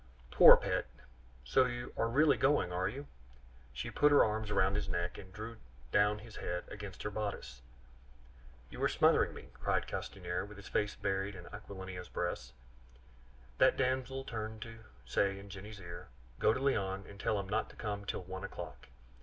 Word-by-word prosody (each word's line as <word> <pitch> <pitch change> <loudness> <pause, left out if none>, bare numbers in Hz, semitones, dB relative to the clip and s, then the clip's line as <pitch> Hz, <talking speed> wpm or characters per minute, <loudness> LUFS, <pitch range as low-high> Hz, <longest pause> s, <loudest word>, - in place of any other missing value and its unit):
"Poor - - +10
pet! - - -1 0.6
so 130 - +4
you 120 0 -5
are 115 - +1
really 145 +5 +5
going, 135 -10 +2
are 90 +1 +1
you?" 140 +7 -7 0.7
she 65 - -5
said. - - -11
She - - -9
put 150 0 +7
her 145 - +7
arms 110 0 -2
round 95 0 +3
his 100 -2 -2
neck, 85 -1 -2
and 95 -1 -11
drew 110 +4 -7 0.3
down 105 +1 +4
his 110 +1 -11
head 90 0 -3
against 100 -3 -7
her 105 - -2
bodice. 100 - -4 1.1
"You - - -8
are - - +3
smothering - - +4
me!" - - -10
cried - - 0
Castanier, 90 -2 -3
with 105 0 -10
his 100 - -10
face 105 0 0
buried 95 +1 -1
in 90 -1 -9
Aquilina's 95 -3 -7
breast. 85 -8 -3 1.1
That - - +5
damsel 130 +1 0
turned 110 -3 -5
to 115 -1 -11 0.2
say 95 +10 +1
in 100 0 -10
Jenny's 105 +2 -8
ear, 85 -1 -8 0.3
"Go - - +5
to 130 - -1
Léon, 100 -8 0
and 100 - -12
tell 105 0 +1
him 100 - -4
not 110 +3 0
to - - -14
come 105 -2 -3
till 100 - -3
one 95 +1 -7
o'clock. - - -7
100 Hz, 185 wpm, -34 LUFS, 95-110 Hz, 1.1 s, Poor